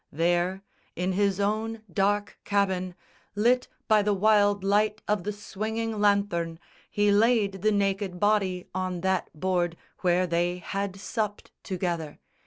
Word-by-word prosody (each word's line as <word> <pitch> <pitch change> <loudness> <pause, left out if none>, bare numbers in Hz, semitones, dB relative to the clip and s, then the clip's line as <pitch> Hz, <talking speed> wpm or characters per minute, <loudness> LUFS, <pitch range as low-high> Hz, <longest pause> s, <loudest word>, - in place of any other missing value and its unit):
There, 175 +4 0 0.3
in 180 +2 -1
his 200 0 +1
own 220 +2 -1
dark 205 +2 0
cabin, 190 -3 0 0.4
Lit 245 +4 +3 0.2
by 215 -1 +5
the 205 0 +1
wild 205 0 +3
light 210 +2 +1
of 210 -4 0
the 210 - -1
swinging 220 +2 -4
lanthorn, 200 -5 +1 0.3
He 205 0 +2
laid 205 -3 +3
the 215 +2 +3
naked 195 -2 0
body 195 -3 +1
on 185 -1 -2
that 190 0 0
board 175 -1 0 0.2
Where 180 0 +2
they 175 +1 0
had 195 +2 -3
supped 205 +1 -4
together. 175 -5 -3
200 Hz, 135 wpm, -27 LUFS, 180-210 Hz, 0.4 s, by